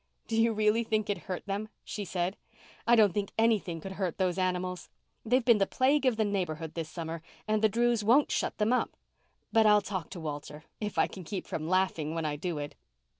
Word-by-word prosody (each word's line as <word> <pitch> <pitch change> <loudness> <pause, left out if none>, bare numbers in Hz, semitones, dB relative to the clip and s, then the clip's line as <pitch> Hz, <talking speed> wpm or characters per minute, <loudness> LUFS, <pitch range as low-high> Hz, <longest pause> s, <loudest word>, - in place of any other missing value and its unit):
"Do 225 - -3
you 225 +1 +4
really 215 +1 +2
think 215 -2 0
it 205 - -5
hurt 185 - -3
them?" 205 +2 -3
she 205 - -5
said. 180 +1 -1 0.5
"I 240 - +7
don't 210 -5 +5
think 200 0 -2
anything 215 -7 +2
could 190 +4 -7
hurt 190 -3 -2
those 185 -1 0
animals. 180 0 -1 0.3
They've 245 +2 +2
been 235 -4 +6
the 195 - +3
plague 275 +1 +2
of 240 -4 +2
the 220 - +2
neighbourhood 165 -6 -2
this 165 -2 -4
summer 165 -1 -5 0.3
and 215 0 +1
the 220 - +5
Drews 235 0 +2
won't 250 +8 +4
shut - - -1
them 215 +3 +2
up. 250 - 0 0.5
But 225 -2 +5
I'll 210 0 +7
talk 190 -5 -4
to 185 - -7
Walter—if 155 +6 -6
I - - +5
can 185 - -9
keep 190 +3 -5
from 155 +1 -4
laughing 180 -4 +1
when 165 -1 -2
I 150 -1 -1
do 170 +2 -3
it." 145 0 -5
195 Hz, 215 wpm, -30 LUFS, 175-220 Hz, 0.5 s, I